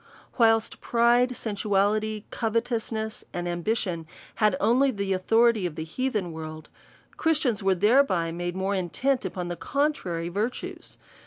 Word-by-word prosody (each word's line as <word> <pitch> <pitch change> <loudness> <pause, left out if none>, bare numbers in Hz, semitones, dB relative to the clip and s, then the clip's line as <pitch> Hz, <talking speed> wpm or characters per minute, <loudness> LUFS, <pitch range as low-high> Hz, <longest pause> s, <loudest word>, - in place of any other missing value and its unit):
Whilst 225 -1 +3
pride, 240 +1 +3
sensuality, 210 0 0
covetousness, 225 -1 -2
and 175 0 -3
ambi 175 +6 -1
tion, 170 -7 -3 0.3
had 210 -4 +3
only 245 +6 +3
the 200 -5 -1
authority 225 +1 +3
of 160 - -8
the 160 - -4
heathen 210 0 -2
world. 155 -1 -8 0.5
Christians 295 -9 +1
were 195 -1 +2
thereby 200 -4 +3
made 175 +1 -4
more 190 +1 -1
intent 205 +8 0
upon 180 -1 -4
the 175 - -3
contrary 190 - -1
virtues. 210 +7 -4
210 Hz, 135 wpm, -26 LUFS, 175-235 Hz, 0.5 s, Whilst